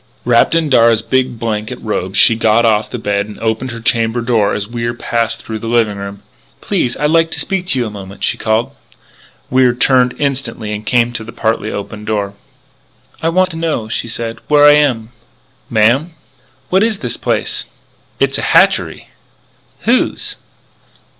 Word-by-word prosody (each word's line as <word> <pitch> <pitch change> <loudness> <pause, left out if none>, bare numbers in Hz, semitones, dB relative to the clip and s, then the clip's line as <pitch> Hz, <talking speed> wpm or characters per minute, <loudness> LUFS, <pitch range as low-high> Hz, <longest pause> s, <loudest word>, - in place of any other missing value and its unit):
Wrapped 120 +6 +3
in 165 -1 +2
Darragh's 115 -4 +4
big 125 +1 0
blanket 110 +1 -3
robe 95 -3 -3
she 115 - +5
got 115 +1 +3
off 105 -1 +2
the - - -5
bed 100 0 -1
and 105 - -10
opened 115 +3 -1
her 120 -1 -6
chamber 115 0 +1
door 115 -4 +1
as 105 -1 -3
Wier 120 0 -3
was 120 - -17
passing 115 -1 -2
through 110 -1 -5
the 115 - -6
living 115 -3 +1
room. 100 0 -8 0.4
"Please 175 -12 -1
I'd 150 +1 +1
like 165 0 +3
to - - -4
speak 190 -2 -2
to 135 - +1
you 125 - 0
a 110 - -5
moment," 100 -1 -9
she - - +1
called. 110 +1 0 0.8
Wier 130 -1 +4
turned 125 -1 +3
instantly 130 -6 -2
and 105 +1 -6
came 120 -1 +2
to 115 - -4
the 115 - -9
partly 110 -1 -1
open 100 +1 -6
door. 105 -2 -2 0.9
"I 165 - +1
want 185 +2 +2
to 160 - -4
know," 155 -10 -2
she 115 - -2
said, 115 0 -4
"where 145 -1 +5
I 145 - +9
am." 130 -7 +2 0.6
"Ma'am?" 120 +8 +2 0.6
"What 190 +1 +4
is 220 -1 +1
this - - -3
place?" - - -2 0.5
"It's - - +1
a - - -1
hatchery - - +2 0.4
" - - -37
"Whose?" 240 +3 0
115 Hz, 180 wpm, -15 LUFS, 110-130 Hz, 0.9 s, I